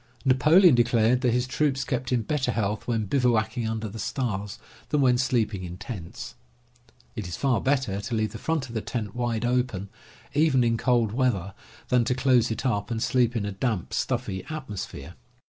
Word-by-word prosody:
Napoleon 150 +7 +6
declared 120 0 +3
that 125 -3 +2
his 125 +1 +1
troops 135 0 0
kept 125 -1 -3
in 120 -3 +1
better 145 +3 0
health 105 -1 -2
when 115 -3 0
bivouacking 115 -2 +1
under 110 0 -3
the 110 +2 -8
stars 105 -4 -3 0.3
than 150 - +1
when 125 -3 +4
sleeping 110 -7 0
in 90 0 -7
tents. 95 -6 -7 0.8
It 105 -5 -4
is 85 - -5
far 135 -4 +1
better 130 -8 0
to 115 +3 -3
leave 110 -2 0
the 110 - -8
front 160 -2 -1
of 115 - -10
the 110 - -2
tent 105 -4 -4
wide 120 -2 -1
open, 120 -6 -1 0.4
even 145 -4 +3
in 115 -1 +2
cold 120 -2 +2
weather, 110 -6 0 0.4
than 125 -1 +4
to 125 - +1
close 125 -2 +3
it 115 - -4
up 105 -4 0
and 115 -2 -2
sleep 125 -1 +2
in 105 -3 -1
a 100 - -3
damp, 100 -2 -2
stuffy 120 -7 -2
atmosphere. 135 -11 -6
120 Hz, 185 wpm, -26 LUFS, 110-130 Hz, 0.8 s, Napoleon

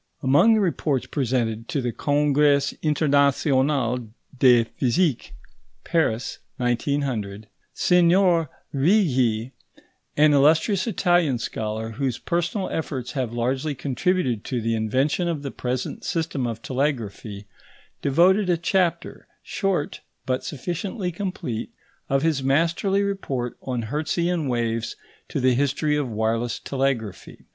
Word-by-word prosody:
Among 145 +13 +5
the - - +2
reports 150 -7 0
presented 120 -4 -1
to 145 - -1
the 125 -2 -1
Congrès 145 -1 +2
international 140 -4 +2 0.3
de 125 -2 +5
physique 130 +5 -1 0.5
(Paris, 140 -9 0 0.2
1900), 120 -5 -2 0.3
Signor 175 -2 +3 0.2
Righi, 130 - +2 0.7
an 150 0 +5
illustrious 160 +8 +3
Italian 175 - +2
scholar, 110 -1 -4
whose 130 0 -2
personal 175 +3 -1
efforts 130 -6 -3
have 130 -5 -2
largely 130 +5 -1
contributed 135 - -1
to 125 - -2
the 115 0 -1
invention 130 - 0
of 160 -4 -2
the 140 - -4
present 125 0 -4
system 160 -6 -2
of 115 -1 -5
telegraphy, 115 -7 -3 0.6
devoted 180 +7 +3
a 175 - +3
chapter, 175 +1 -1 0.2
short, 190 -7 -2 0.2
but 130 0 -1
sufficiently 180 - -4
complete, 170 - -4 0.4
of 135 +1 +1
his 160 -4 +1
masterly 170 +8 +1
report 140 -12 -3
on 125 -3 -3
Hertzian 160 +6 -1
waves, 115 -2 -1 0.3
to - - -3
the 130 -1 +3
history 145 +3 +1
of 145 -4 -1
wireless 115 +2 -1
telegraphy. 130 -8 -3
140 Hz, 115 wpm, -24 LUFS, 120-165 Hz, 0.7 s, Among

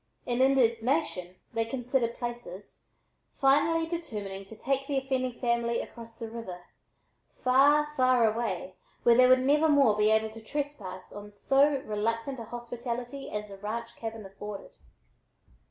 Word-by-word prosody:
In 245 0 0
indignation 240 - +2 0.2
they 230 - +1
considered 245 0 -1
places, 240 -6 -7 0.5
finally 315 +4 +3
determining 210 - -5
to 220 - -12
take 270 +4 -1
the 280 - 0
offending 260 -2 -1
family 235 -1 +1
across 230 -1 -9
the 230 -2 -6
river, 185 -7 -7 0.7
far, 285 +4 +4
far, 255 -3 +4
away 215 -5 -1 0.3
where 235 - +6
they 250 +2 +6
would 255 0 +6
never 295 +4 +3
more 275 -7 +5
be 210 0 +3
able 220 0 +2
to 225 +1 -11
trespass 220 -8 -5
on 205 0 -8
so 270 +6 +2
reluctant 230 +5 -2
a 230 - -6
hospitality 240 +3 -5
as 210 0 -4
the 195 - -9
ranch 230 +3 -5
cabin 225 -2 -6
afforded. 205 - -8
235 Hz, 140 wpm, -29 LUFS, 215-270 Hz, 0.7 s, where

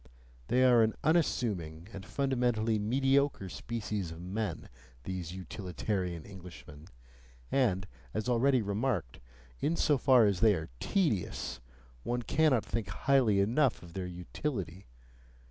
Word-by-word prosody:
They 130 +1 +3
are 125 -2 +6
an 110 0 +2
unassuming 105 - 0
and 95 - -7
fundamentally 120 -3 0
mediocre 135 -1 +1
species 105 -3 -4
of 80 0 -9
men, 90 -1 -4 0.4
these 90 -2 -5
utilitarian 90 -1 -4
Englishmen, 85 -5 -12 0.6
and, 100 -9 +2 0.3
as 110 - -3
already 125 0 +3
remarked, 100 - -2 0.4
in 165 - 0
so 145 -4 +2
far 125 -4 +6
as 100 -3 +1
they 110 -3 +5
are 80 -4 -5
tedious, 110 - -1 0.4
one 120 - -2
cannot 145 -4 +2
think 115 -3 -3
highly 130 -7 +2
enough 120 +5 +2
of 85 -1 -12
their 95 -1 -4
utility. 90 - -5
105 Hz, 125 wpm, -31 LUFS, 90-130 Hz, 0.6 s, are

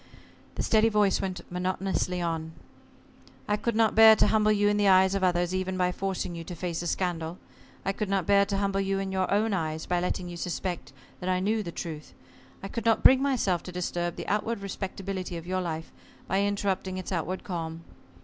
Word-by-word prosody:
The - - -2
steady 220 0 +4
voice 210 -3 +2
went 185 -2 -3
monotonously 180 0 -1
on. 160 -1 -3 0.9
"I 210 - +2
could 230 +1 -2
not 225 -1 +3
bear 220 0 +9
to - - +4
humble 215 -1 +3
you 205 -1 +3
in 205 0 +2
the 205 -1 +3
eyes 190 0 +5
of 195 -1 -1
others 175 -1 +2
even 185 0 -2
by 180 0 +2
forcing 190 -1 -3
you 165 -1 -6
to 175 - -7
face 170 -1 -3
a 175 - -3
scandal. 170 -2 -2 0.5
I 195 - +2
could 210 0 -3
not 195 -3 +1
bear 200 +1 +5
to 200 -1 -1
humble 195 0 0
you 195 0 0
in 195 0 -3
your 190 -1 0
own 210 +2 +2
eyes 160 -3 -2
by 180 -1 0
letting 180 0 -2
you 175 -1 -7
suspect 180 0 -4 0.3
that 180 - -3
I 185 0 +2
knew 215 +4 +1
the 175 -4 -5
truth. 155 -3 -7 0.5
I - - -3
could 230 +3 -5
not 225 -1 +2
bring 265 0 +7
myself 235 - +1
to 180 - -8
disturb 175 -1 -2
the - - -7
outward 210 +1 -1
respectability 195 -2 -4
of 165 - -8
your 185 +1 -1
life 160 -2 -4 0.4
by 195 +2 +1
interrupting 200 -2 -1
its 185 - -6
outward 185 +1 -2
calm. 165 -3 -5
185 Hz, 210 wpm, -28 LUFS, 175-200 Hz, 0.9 s, bear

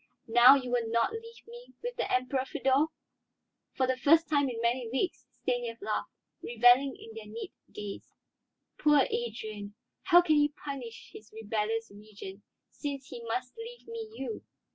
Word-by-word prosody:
"Now 240 +3 +8
you 255 -3 -2
will 235 -2 +1
not 230 - +2
leave 460 +1 -9
me 480 +1 -12
with 485 0 -3
the - - -2
Emperor, 255 +1 +1
Feodor?" 270 +2 +2 0.9
For 260 - +2
the 260 0 0
first 325 +4 +5
time 285 -3 +2
in 235 -2 -5
many 235 +1 0
weeks 270 -1 -2 0.2
Stanief 245 -2 -1
laughed, - - -2 0.3
reveling 245 +3 +5
in 225 - -11
their 220 -1 -9
knit 230 +1 -6 0.2
gaze. 205 -1 -7 0.7
"Poor 295 -2 +5
Adrian! 215 -3 -4 0.3
How 350 -2 +7
can 310 -3 +4
he 295 0 +4 0.2
punish 255 -6 -7
his 215 - -12
rebellious 220 +1 -2
Regent, 205 -1 -10 0.3
since 280 -2 -5
he 235 - -8
must 250 +2 -3
leave 465 +1 -9
me 455 -1 -6
you? 450 - -5
250 Hz, 160 wpm, -30 LUFS, 225-295 Hz, 0.9 s, Now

